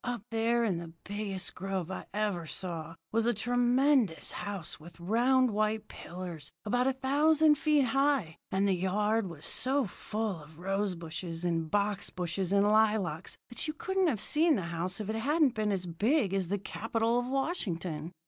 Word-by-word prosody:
Up 245 -4 -3
there 230 +1 +2
in 190 -7 0
the 165 -1 -9
biggest 200 -3 -3
grove 190 -2 -3
I 190 - -6
ever 200 -5 -1
saw 165 -2 -4 0.2
was 225 +1 +2
a 240 - +2
tremendous 245 - +2
house 205 -6 -4
with 165 +2 -14
round 245 +7 +3
white 215 +1 0
pillars 170 -4 -7
about 245 +4 +1
a 265 - +2
thousand 300 +4 +4
feet 295 -1 +3
high, 270 - +1
and 195 +1 +2
the 195 - +3
yard 205 +4 +1
was 155 -3 -8
so 270 +1 +2
full 210 -2 -4
of 150 +1 -15
rose 195 +2 -1
bushes 165 +1 -5
and 165 -2 0
box 205 +1 +1
bushes 180 +1 -3
and 200 0 +4
lilacs 210 -5 +2
that 240 - -3
you 310 - -3
couldn't 380 +2 0
have 245 -10 0
seen 310 +6 +4
the 195 - -2
house 180 +4 -2
if 210 - -4
it 220 - -1
hadn't 290 +3 +2
been 215 -2 0
as 185 -2 -1
big 205 - +1
as 190 -3 0
the 200 +3 0
Capitol 225 +4 -1
at 245 - -5
Washington. 180 - -2
210 Hz, 175 wpm, -31 LUFS, 180-245 Hz, 0.2 s, thousand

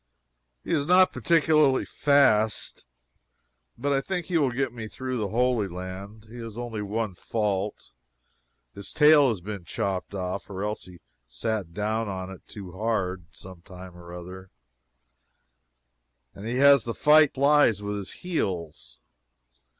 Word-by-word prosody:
He - - -6
is 145 -3 +1
not 185 +1 +5
particularly 155 -4 +3
fast, 110 - +2 0.9
but 140 +3 0
I 135 - +1
think 180 +3 -3
he 180 -3 0
will 140 -3 +2
get 125 0 -2
me 110 -2 -6
through 130 +3 -5
the 105 -3 -1
Holy 120 -1 +1
Land. 95 +4 -8
He 115 +2 -11
has 115 -1 -8
only 120 -3 -4
one 105 0 -3
fault. 105 +1 -3 0.8
His 100 - -8
tail 150 -3 +6
has 105 -6 -3
been 100 0 -6
chopped 95 +3 -3
off 95 +1 -4
or 95 0 -5
else 105 +1 -4
he 90 - -13
has 90 - -15 0.3
sat 100 - -4
down 110 +1 -1
on 95 -1 -5
it 95 - -11
too 95 -4 -9
hard, 95 -3 -2
some 95 -2 -12
time 90 -1 -12
or 85 0 -12
other, 90 +2 -9 1.8
and 100 +3 -9
he 120 - -2
has 140 -2 +6
to 115 - -3
fight 150 -1 +5
the 135 - -6
flies 140 -8 +4
with 105 0 -3
his 100 -2 -6
heels. 95 - -4
110 Hz, 155 wpm, -26 LUFS, 95-135 Hz, 1.8 s, tail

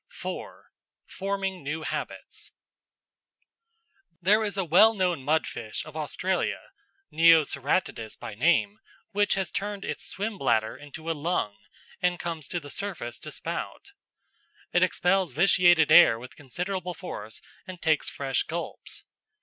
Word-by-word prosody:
§ - - -62
4 - - -7 0.3
Forming 195 -3 -3
New 150 +3 -3
Habits - - -6 1.7
There 205 +4 +4
is 205 -2 -3
a 190 - 0
well 205 +8 +6
known 180 -7 0
mudfish 135 -7 -1
of 155 -1 -11
Australia, 170 +4 -2 0.4
Neoceratodus 155 -7 +3
by - - -7
name, 175 - +2 0.3
which 205 0 +2
has 190 -4 -2
turned 200 0 -4
its - - -4
swim 205 0 -3
bladder 110 -4 +1
into 155 +3 -7
a - - +1
lung 150 - -1 0.5
and 180 0 +1
comes 165 -5 -4
to 175 - -2
the 145 -3 -10
surface 170 -13 -5
to - - -8
spout. 400 - -6 0.8
It 175 - +4
expels 185 0 +2
vitiated 175 -2 +5
air 145 -10 +8
with 125 +2 -11
considerable 180 +6 -4
force 110 - -7 0.3
and 185 -2 -8
takes 160 -3 +1
fresh 135 -2 -1
gulps. 170 +2 -5
175 Hz, 135 wpm, -27 LUFS, 145-190 Hz, 1.7 s, air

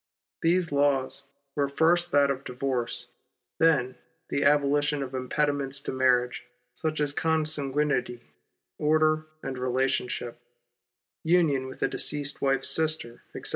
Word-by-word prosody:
These 170 0 +2
laws 140 -1 +1 0.3
were, 140 -1 +1
first, 170 +5 +2
that 140 -1 +4
of 135 0 -4
divorce, 125 -2 -3 0.5
then, 150 -6 +2 0.3
the 140 - 0
abolition 145 0 +2
of 130 0 -8
impediments 140 +1 -1
to - - -4
marriage, 125 -1 +2 0.3
such 155 -2 -3
as 145 -1 0
consanguinity, 150 -5 0 0.6
order, 155 +1 +2 0.2
and 130 -1 -5
relationship, 125 -1 -1 0.8
union 160 -6 +2
with 130 - -7
a - - +3
deceased 145 -1 -2
wife's 135 -1 +1
sister, 155 -7 0
etc. - - -4
140 Hz, 120 wpm, -27 LUFS, 130-155 Hz, 0.8 s, that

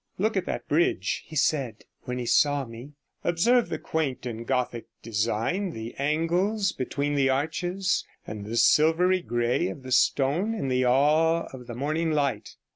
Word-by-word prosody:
'Look 215 +3 0
at 190 - -1
that - - -4
bridge,' 165 +4 +1
he 160 - -10
said, 130 -6 0 0.2
when 125 -1 -3
he 125 - -3
saw 145 +2 +3
me; 120 +5 -11 0.3
'observe 230 +9 +2
the - - -2
quaint 145 -6 -3
and 115 -1 -6
Gothic 125 -3 -1 0.2
design, 115 - -1
the 110 +1 -7
angles 175 +8 +1
between 140 +3 -2
the 135 -2 +2
arches, 175 +7 0 0.2
and 105 -1 -6
the 110 +3 -4
silvery 170 +7 +4
grey 120 +4 0
of 140 - -7
the 130 - -8
stone 145 - +2
in 140 -11 -3
the 130 0 +2
awe 155 +6 +3
of 125 -2 -10
the 120 - -6
morning 155 +6 -1
light. 140 -3 -1
145 Hz, 165 wpm, -26 LUFS, 125-170 Hz, 0.3 s, silvery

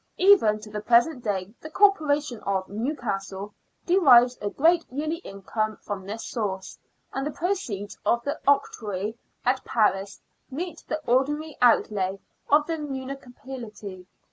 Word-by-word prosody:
Even 360 - +5
to 210 0 -11
the 210 0 -4
present 240 +4 +3
day 200 -2 -2
the 310 - -8
Corporation 300 - +3
of 190 -2 -1
Newcastle* 205 -4 -4 0.3
derives 255 -10 +6
a 205 - -1
great 335 +8 +3
yearly 305 +5 -2
income 215 - -4
from 195 -2 -6
this 220 +2 -5
source, 195 -5 -4 0.3
and 270 - -2
the 295 - -1
proceeds 290 - -3
of 235 0 +2
the 285 - -3
octroi 215 -7 +1 0.3
at 255 +1 +1
Paris 200 -3 +1 0.3
meet 325 +4 -5
the 310 - -1
ordinary 295 +5 +1
outlay 200 -5 +3 0.3
of 295 +1 +5
the 330 0 -2
munici 270 -2 -6
pality. 210 -8 -8
240 Hz, 140 wpm, -26 LUFS, 205-295 Hz, 0.3 s, derives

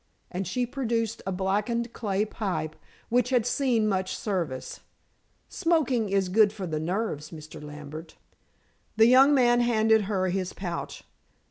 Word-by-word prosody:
and 185 0 -3
she 245 +7 -1
produced 230 -3 -2
a - - 0
blackened 210 +6 -1
clay 205 -2 -1
pipe 180 -8 -3 0.3
which 245 +1 +2
had 245 -4 +2
seen 245 -4 +1
much 190 -2 -1
service. 170 -11 -3 0.7
"Smoking 285 - +1
is 195 -1 +1
good 205 +2 +4
for 205 -3 -6
the 155 -3 -2
nerves, 165 -3 -2
Mr. 155 -2 -10
Lambert." 150 +2 -9 0.8
The 220 - +7
young 260 +4 +7
man 240 -2 +4
handed 220 -3 +3
her 190 -2 0
his 185 0 -2
pouch. 175 -3 -5
210 Hz, 140 wpm, -27 LUFS, 180-235 Hz, 0.8 s, The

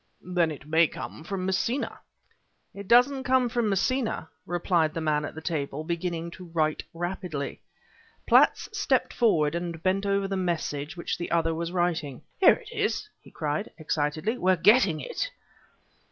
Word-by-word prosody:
"Then 175 -2 +1
it 145 -2 -8
may 160 +2 +4
come 155 - -8
from 185 +1 -3
Messina." 210 +8 -1 0.7
"It 200 -1 -9
doesn't 250 +4 +5
come 255 -1 +3
from 235 -2 0
Messina," 215 -2 0 0.2
replied 175 -2 +1
the - - -1
man 150 -2 0
at - - -7
the 160 - -7
table, 150 -3 -2
beginning 170 0 -3
to 180 +1 -10
write 155 -1 +1
rapidly. 175 -4 -4 0.6
Platts - - +5
stepped 280 -11 +1
forward 165 -11 +3
and 170 -1 -4
bent 195 +2 +1
over 200 0 +1
the 195 - -2
message 165 -5 -2
which 170 - -3
the 175 - -4
other 165 -1 +1
was 170 +1 -3
writing. 170 -7 -1 0.2
"Here 385 - +7
it - - -12
is!" 425 -1 -1
he - - -16
cried, 150 +6 -3
excitedly; 155 +8 -1
"we're 185 +1 +4
getting 195 -3 +4
it." - - -3
175 Hz, 160 wpm, -27 LUFS, 160-200 Hz, 0.7 s, Here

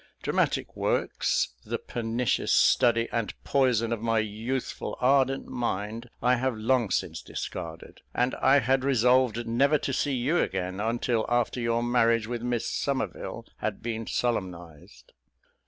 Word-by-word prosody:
Dramatic - - 0
works, - - 0
the - - -3
pernicious 115 0 -1
study 115 -1 +4
and 115 -3 -2
poison 120 -4 +2
of 115 - -4
my 115 0 +1
youthful 110 +4 -3
ardent 135 +1 +3
mind, 115 0 -3
I 125 0 +4
have 130 -2 -1
long 115 0 +1
since - - -2
discarded; 80 0 -7
and 125 +1 0
I 140 +1 +5
had 130 +2 +2
resolved 125 -2 +3
never 140 +6 +3
to 135 - -3
see 140 +1 0
you 135 +8 +1
again, 95 0 -2
until 115 +1 0
after 120 +1 +1
your 115 0 +1
marriage 115 -2 +3
with 120 +1 -4
Miss 120 -1 -1
Somerville 135 -4 -3
had 110 -2 -4
been 115 -1 -3
solemnised. 90 -9 -4
120 Hz, 140 wpm, -27 LUFS, 110-125 Hz, -, I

